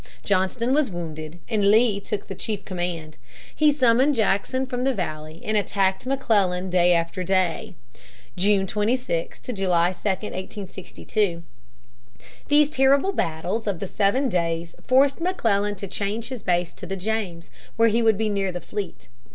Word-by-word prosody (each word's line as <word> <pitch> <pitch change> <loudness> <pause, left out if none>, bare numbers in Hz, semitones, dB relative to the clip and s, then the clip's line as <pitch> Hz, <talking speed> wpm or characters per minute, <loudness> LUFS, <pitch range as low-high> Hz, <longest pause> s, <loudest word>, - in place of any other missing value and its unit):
Johnston 205 +6 +1
was 300 -3 +2
wounded, 160 -2 -6
and 205 -3 +2
Lee 220 -1 +4
took 200 0 -5
the - - -5
chief 205 +1 -4
command. 175 -4 -4 0.4
He 305 -1 +5
summoned 265 0 +3
Jackson 225 +4 +1
from 250 -1 -3
the 270 -1 +1
Valley 155 -3 -5
and 215 - 0
attacked 195 0 0
McClellan 195 -9 +1
day 180 -1 +4
after 170 +2 -1
day, 185 -1 0 0.6
June 195 +1 +2
26 210 -3 -1
to 250 - -5
July 180 -3 +2
2, 175 - -21
1862. 190 -1 -3 1.0
These 295 0 +4
terrible 275 +7 +3
battles 180 - -2
of 200 -3 0
the - - -3
Seven 210 +8 +1
Days 170 -4 -1
forced 275 +4 +3
McClellan 210 - +1
to 200 +1 -6
change 205 +5 -3
his 255 -4 -6
base 175 -1 0
to - - -9
the 195 +1 -3
James, 190 -4 -3 0.2
where 230 0 +4
he 230 +2 +2
would 220 -3 +4
be 220 +1 0
near 200 -2 0
the 180 - -5
fleet. 195 +2 -6
200 Hz, 155 wpm, -24 LUFS, 180-230 Hz, 1.0 s, He